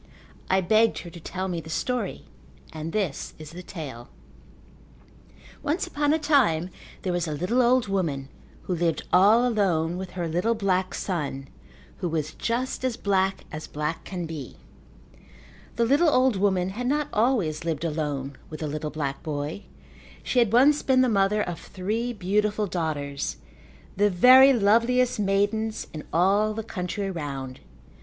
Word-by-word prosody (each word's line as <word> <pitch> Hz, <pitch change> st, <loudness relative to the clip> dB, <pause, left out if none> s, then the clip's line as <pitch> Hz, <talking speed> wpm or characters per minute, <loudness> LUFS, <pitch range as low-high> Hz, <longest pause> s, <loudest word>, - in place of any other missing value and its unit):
I 190 Hz, 0 st, +3 dB
begged 220 Hz, +5 st, +3 dB
her 170 Hz, -, -9 dB
to 170 Hz, -, -10 dB
tell 185 Hz, +3 st, -4 dB
me 175 Hz, -3 st, -3 dB
the 160 Hz, -, -12 dB
story 250 Hz, +9 st, -2 dB, 0.5 s
and 160 Hz, +1 st, -5 dB
this 190 Hz, -9 st, -2 dB
is 155 Hz, -1 st, -10 dB
the 175 Hz, +2 st, -8 dB
tale: 145 Hz, -10 st, -8 dB, 1.5 s
Once 310 Hz, +4 st, -1 dB
upon 290 Hz, 0 st, 0 dB
a 315 Hz, -, +3 dB
time 235 Hz, -, +2 dB, 0.3 s
there 185 Hz, -, -1 dB
was 175 Hz, -1 st, -1 dB
a 155 Hz, -, -2 dB
little 180 Hz, -, +1 dB
old 245 Hz, -1 st, +3 dB
woman 160 Hz, -9 st, -1 dB, 0.4 s
who 185 Hz, -, -2 dB
lived 170 Hz, -1 st, 0 dB
all 215 Hz, +7 st, +6 dB
alone 180 Hz, -7 st, +1 dB
with 185 Hz, -1 st, -6 dB
her 175 Hz, -2 st, -1 dB
little 180 Hz, +8 st, 0 dB
black 190 Hz, -3 st, 0 dB
son 140 Hz, -7 st, -3 dB, 0.5 s
who 180 Hz, -, -2 dB
was 155 Hz, -1 st, -2 dB
just 250 Hz, +3 st, -2 dB
as 255 Hz, -3 st, -1 dB
black 195 Hz, -1 st, 0 dB
as 155 Hz, +1 st, -6 dB
black 150 Hz, +2 st, -3 dB
can 180 Hz, -3 st, -5 dB
be. 155 Hz, -5 st, -7 dB, 1.2 s
The 235 Hz, -, +2 dB
little 290 Hz, +7 st, +4 dB
old 255 Hz, -4 st, +3 dB
woman 190 Hz, -2 st, +1 dB
had 240 Hz, +6 st, -4 dB
not 295 Hz, +2 st, +1 dB
always 210 Hz, -, +1 dB
lived 165 Hz, -1 st, -2 dB
alone 145 Hz, -4 st, -3 dB
with 155 Hz, 0 st, -8 dB
the 155 Hz, -, -2 dB
little 150 Hz, +1 st, -3 dB
black 145 Hz, -3 st, -4 dB
boy. 150 Hz, +4 st, -4 dB, 0.6 s
She 250 Hz, -, +1 dB
had 235 Hz, -4 st, +3 dB
once 280 Hz, +5 st, +5 dB
been 260 Hz, -1 st, +3 dB
the 255 Hz, -, +3 dB
mother 210 Hz, 0 st, +2 dB
of 175 Hz, -2 st, -5 dB
three 215 Hz, +6 st, -3 dB
beautiful 210 Hz, +1 st, 0 dB
daughters, 150 Hz, -6 st, -3 dB, 0.6 s
the 205 Hz, +1 st, +3 dB
very 255 Hz, +8 st, +8 dB
loveliest 235 Hz, +2 st, +3 dB
maidens 205 Hz, +2 st, 0 dB
in 155 Hz, -, -7 dB
all 200 Hz, +5 st, +2 dB
the 225 Hz, -, -3 dB
country 195 Hz, -1 st, -4 dB
round. 135 Hz, -6 st, -5 dB
190 Hz, 160 wpm, -25 LUFS, 160-225 Hz, 1.5 s, very